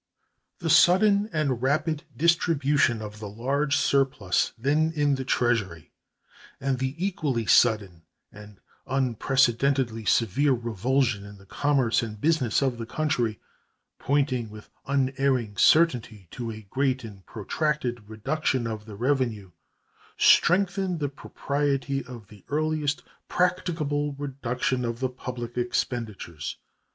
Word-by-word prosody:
The 170 -3 -3
sudden 200 +3 +5
and 140 -6 -1
rapid 150 +4 0
distribution 145 -7 +2
of 105 0 -8
the 105 -2 -6
large 140 +7 0
surplus 135 -10 +1
then 150 +6 +1
in 145 -1 +2
the 135 -1 -2
Treasury 110 - -1 0.7
and 135 -1 -1
the 130 +1 -2
equally 160 - -1
sudden 100 -6 +3 0.3
and 105 -2 -13 0.3
unprecedentedly 130 -1 +1
severe 120 +7 +2
revulsion 120 0 0
in 100 0 -11
the 100 - -17
commerce 135 0 +1
and 110 -2 -6
business 145 -4 +1
of 125 -3 -1
the 115 - -5
country, 120 -6 -1 0.6
pointing 135 -5 0
with 105 0 -13 0.2
unerring 135 -5 0
certainty 120 - +3
to 120 -2 -5
a 110 -1 -8
great 135 -1 0
and 100 -4 -10
protracted 120 -1 -2
reduction 130 +3 -1
of 110 -2 -5
the 110 -2 -9
revenue, 120 -5 -1 0.7
strengthened 185 -1 +3
the 145 -2 -1
propriety 140 -1 -2
of 120 -5 -10
the 105 -4 -16
earliest 155 -1 -1 0.2
practicable 160 -5 0
reduction 130 -2 -2
of 115 -1 -3
the 130 -1 0
public 125 -1 -6
expenditures. 110 - -3
130 Hz, 120 wpm, -26 LUFS, 115-145 Hz, 0.7 s, sudden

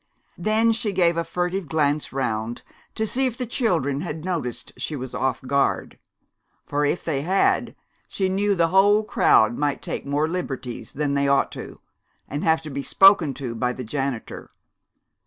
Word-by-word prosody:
Then 220 +2 +2
she 220 -2 -2
gave 175 -2 +3
a 170 - 0
furtive 180 +1 -2
glance 150 0 0
around 120 -3 -3 0.3
to 220 - 0
see 260 +4 +1
if 240 -2 -5
the 250 - -2
children 170 - 0
had 160 -2 -5
noticed 160 -10 -3
she 155 - -4
was 130 -2 -6
off 130 -1 -1
guard; 140 +1 0 0.7
for 145 0 -1
if 145 - -1
they 145 -4 -1
had 190 +6 +1 0.3
she 190 - -1
knew 200 +2 +1
the 165 -2 +2
whole 205 +3 +5
crowd 120 - +3
might 145 -1 0
take - - -4
more 145 +2 0
liberties 135 -8 -5
than 145 -1 -1
they 140 0 +1
ought 140 0 +2
to, - - -9 0.5
and 145 +2 -4
have 160 0 +2
to 155 - -7
be 140 +1 -3
spoken 180 -4 +5
to 130 -4 -5
by 125 +2 -1
the 125 - -6
janitor. 135 0 -4
155 Hz, 175 wpm, -23 LUFS, 135-190 Hz, 0.7 s, whole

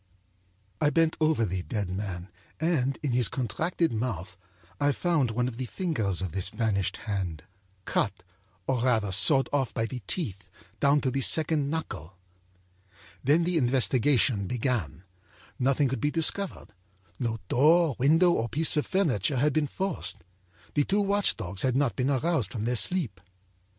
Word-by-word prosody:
âI 150 -1 +2
bent 165 +2 +2
over 155 -7 +2
the 95 -2 -3
dead 105 0 -3
man 95 -1 -5 0.3
and, 145 -5 0
in 145 - 0
his 120 -2 +3
contracted 155 - -1
mouth, 105 -6 -4 0.4
I 145 0 +2
found 160 -5 +1
one 120 +2 -1
of 120 -2 -6
the 130 -1 -4
fingers 110 - -1
of 95 - -4
this 95 +1 0
vanished 105 -3 -1
hand, 95 -7 -3 0.4
cutâor - - +1 0.7
rather 110 -5 +1
sawed 120 +9 +5
off 135 -4 0
by 115 - 0
the 125 +2 -6
teeth 105 - -4 0.3
down 140 +1 +3
to 130 - 0
the 135 +2 -1
second 155 0 +3
knuckle. 95 - -5 1.1
âThen 155 +5 +3
the 175 -1 0
investigation 125 -4 +2
began. 115 - -2 0.6
Nothing 135 +2 +2
could 130 +1 -3
be 145 - +1
discovered. 165 - 0 0.5
No 115 -3 -2
door, 155 +1 +4
window 165 +7 +4
or 115 -7 -1
piece 160 +6 +3
of 150 - 0
furniture 145 - 0
had 145 +3 +2
been 155 -2 +1
forced. 120 - -3 0.5
The 145 - +2
two 200 +7 +1
watch 200 0 +1
dogs 95 -3 -6
had 130 -1 0
not 135 -2 +1
been 130 +1 0
aroused 140 - 0
from 110 -2 -3
their 125 +1 0
sleep. 120 - 0
130 Hz, 155 wpm, -27 LUFS, 105-155 Hz, 1.1 s, sawed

